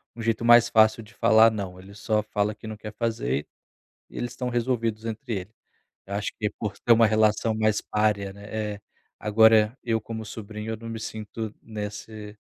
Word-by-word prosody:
um 120 - -7
jeito 115 0 0
mais 120 0 +7
fácil 110 +1 +4
de 110 +2 -17
falar 115 -1 +5
"não", 100 -4 -5
ele 95 +2 -13
só 105 +1 0
fala 105 0 -1
que 105 - -14
não 110 -1 -6
quer 105 0 -8
fazer 75 - -1 0.6
e - - -12
eles 120 0 -3
estão 125 0 -4
resolvidos 115 -3 -1
entre 115 +2 -4
eles. 95 +4 -11 0.5
Eu 100 - -5
acho 100 0 -2
que 105 - -1
é - - 0
por 105 -2 -4
ter 120 - +3
uma 115 -1 +6
relação 110 +1 +2
mais 110 -1 +1
parea, 105 -2 0
né? 105 0 -5 0.4
Agora 110 +1 +5
eu, 115 -2 +1
como 110 0 -6
sobrinho, 105 +1 -6
eu - - -3
não 115 +1 -8
me 115 - -5
sinto 110 0 -6
nesse 105 0 -7
110 Hz, 190 wpm, -26 LUFS, 105-115 Hz, 0.6 s, mais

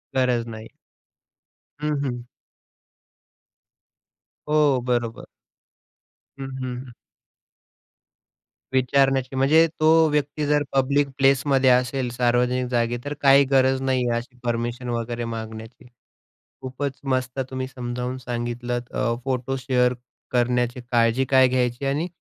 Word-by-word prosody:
गरज 125 -3 +1
नाही. 110 -1 -8 1.1
हं, 150 0 0
हं. 120 -2 -3 2.3
हो, 150 -3 +3
बरोबर. 120 -2 -1 1.1
हं, 135 - -4
हं, 130 -1 -4
हं. 125 - -12 1.8
विचारण्याची 135 0 +2
म्हणजे 150 +5 +4
तो 155 - +3 0.2
व्यक्ती 150 0 -1
जर 145 0 +2
पब्लिक 140 +2 +2
प्लेसमध्ये 135 -1 +3
असेल, 125 +1 +2
सार्वजनिक 125 +1 +1
जागी, 120 0 0
तर 145 - -3
काही 140 0 +6
गरज 130 0 +3
नाही 130 -2 0
आहे 115 - +1
अशी 120 +1 -8
परमिशन 120 +1 -2
वगैरे 120 0 -3
मागण्याची. 110 +1 -7 0.8
खूपच 135 +1 -4
मस्त, 130 -1 -2
तुम्ही 130 0 -4
समजावून 125 -1 -5
सांगितलंत 120 0 -4
अ, 115 - 0
फोटो 130 0 -1
शेअर 125 -1 +1 0.4
करण्याची 125 0 +1
काळजी 120 +2 +3
काय 130 0 +5
घ्यायची? 125 +1 -1
आणि 145 +5 0
125 Hz, 110 wpm, -23 LUFS, 120-135 Hz, 2.3 s, काही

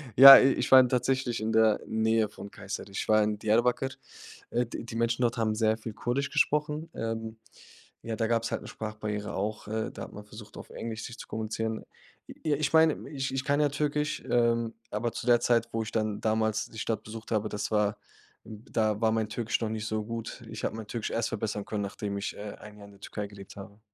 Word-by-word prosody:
ja, 135 +1 +13
i 135 0 +4
ich - - -2
war 130 - +11
in 125 -1 +5
tatsächlich 125 -2 0
in 110 +1 -1
der 110 -1 +4
Nähe 110 -1 +1
von 100 -1 -10
Kayseri, 100 0 -7
ich - - -3
war 110 0 +5
in 105 0 -1
Diyarbakır, 120 +5 +2 0.6
äh, 120 +1 +1
die 115 - -7
die 115 - -8
Menschen 115 +1 0
dort 120 0 +1
haben 110 -1 +1
sehr 110 0 +2
viel 110 -1 -7
Kurdisch 130 +6 -1
gesprochen. 150 +2 0
Ähm, 115 0 -4 0.7
ja, 115 -1 -3
da 115 0 0
gab’s 115 0 0
halt - - -2
'ne - - -10
Sprachbarriere 105 -1 -5
auch, 105 +2 -3
äh, 110 +1 -2
da - - -7
hat - - -10
man 105 0 -9
versucht, 105 0 -12
auf - - -10
Englisch 110 -1 -5
sich 120 - -8
zu - - -9
kommunizieren. 110 0 -3 0.4
J - - -11
ja, 150 -2 +3
ich 145 -2 0
meine, 160 -1 +4
ich 135 -2 -3
ich 135 0 -1
kann 145 0 +2
ja 145 - +3
Türkisch, 150 +1 -1
ähm, 115 -1 +2 0.2
aber 115 +3 -1
zu - - -6
der 120 -1 +6
Zeit, 115 -1 +2
wo 115 - 0
ich 110 - -7
dann 110 -2 -1
damals 110 -1 +1
die 110 - -10
Stadt 115 - -2
besucht 110 +1 -9
habe, 110 -1 0
das 105 +1 -4
war 105 -1 +1 0.5
hm, 110 0 -11
da 110 -1 +1
war 110 -1 +3
mein 110 -1 0
Türkisch 115 +1 -1
noch 110 - -1
nicht 110 -1 -3
so 110 -1 -1
gut. 115 0 -6
Ich - - -7
habe - - -1
mein 110 -2 -7
Türkisch 115 -1 -4
erst 115 0 0
verbessern 105 -1 -3
können, 105 -2 -3
nachdem 100 0 -4
ich, 100 - -4
äh, 105 0 -7
ein 105 0 -12
Jahr 100 - -12
in 100 - -14
der 100 - -19
Türkei 105 -1 -5
gelebt 100 -1 -12
habe. 100 +2 -11
110 Hz, 235 wpm, -29 LUFS, 105-120 Hz, 0.7 s, ja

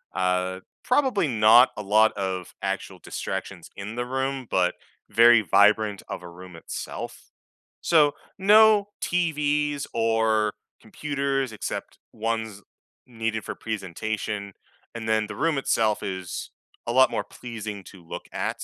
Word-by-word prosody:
uh, 90 0 0 0.2
probably 250 - +2
not 115 +1 +6
a 105 - -4
lot 110 +2 +4
of 95 -2 -4
actual - - -3
distractions - - -6
in 100 +2 -6
the 120 0 -2
room, 130 0 -2
but 90 -1 +2 0.3
very 115 +1 +6
vibrant 105 +1 +3
of - - -6
a 90 - -9
room 90 +1 -12
itself, 80 - -7 0.5
so 150 -4 +4 0.3
no 210 +1 +6
TVs 150 -4 0
or 110 -2 +2 0.3
computers, 135 0 -2
except 110 - -5
ones 110 -2 -3 0.4
needed 115 -3 -3
for - - -4
presentation, 105 0 -4 0.4
and 115 -1 -5
then 110 -1 +1
the - - -7
room 165 -3 +1
itself 110 -5 +1
is 95 -3 -5 0.4
a - - 0
lot 130 +2 +5
more - - -1
pleasing 110 -4 -7
to 95 -3 -14
look - - -7
at. - - -3
110 Hz, 130 wpm, -25 LUFS, 100-135 Hz, 0.5 s, not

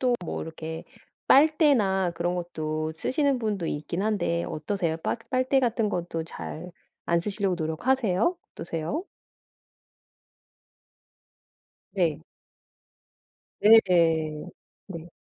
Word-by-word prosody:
또 250 -2 +2
뭐 - - -4
이렇게 160 0 -7 0.4
빨대나 265 - +4
그런 175 +1 -1
것도 155 -2 -3
쓰시는 280 - +1
분도 205 -7 -2
있긴 155 +4 -3
한데 200 -6 0
어떠세요? 160 +1 -2
빨 230 - -2
빨대 260 +1 +2
같은 230 -3 +1
것도 170 -3 -3
잘 170 +1 -8 0.3
안 170 0 +2
쓰시려고 195 -1 -1
노력하세요? 200 - +1 0.2
어떠세요? 165 - -4 2.9
네. 170 -7 +1 1.4
네네. 165 -8 +4 0.4
네. 170 -3 -8
180 Hz, 200 characters per minute, -26 LUFS, 160-225 Hz, 2.9 s, 빨대나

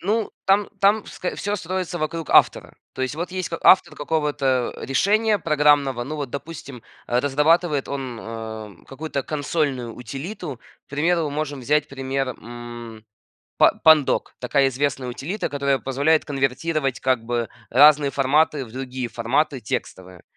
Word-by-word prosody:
Ну 215 +4 0
там 200 +1 +3
там 205 +2 +3
ск 180 - -5
всё 205 +1 -2
строится 185 -1 -3
вокруг 160 0 -3
автора. - - +4 0.2
То 130 - -4
есть, 130 +1 -2
вот 170 +4 -4
есть 185 -1 -3
к 165 - -4
автор 175 -3 +6
какого-то 145 -5 0
решения 210 - +2
программного. 145 -6 +2
Ну, 155 +4 -5
вот, 140 -4 -4
допустим, 140 -4 -8 0.3
э, 120 - +2
разрабатывает 150 +2 +2
он, 130 -4 -5
э, 110 -2 -7
какую-то 140 0 -4
консольную 145 -5 -2
утилиту. 135 - -7 0.3
К - - -64
примеру, 160 +2 +1
можем 145 -2 -3
взять 150 +4 +1
пример, 135 -1 -2
м, 120 -2 -9 0.5
па - - +5
Pandoc- 155 -3 +5 0.2
такая 135 +2 +2
известная 135 -1 -2
утилита, 155 - -4
которая 140 -1 0
позволяет 140 +5 +1
конвертировать 135 0 -1
как 130 -3 +1
бы 120 -1 -2 0.2
разные 145 +2 +6
форматы 140 +1 +2
в 115 - -14
другие 130 -1 -4
форматы 125 +4 0
текстовые. 95 -4 -5
140 Hz, 145 wpm, -23 LUFS, 125-160 Hz, 0.5 s, автор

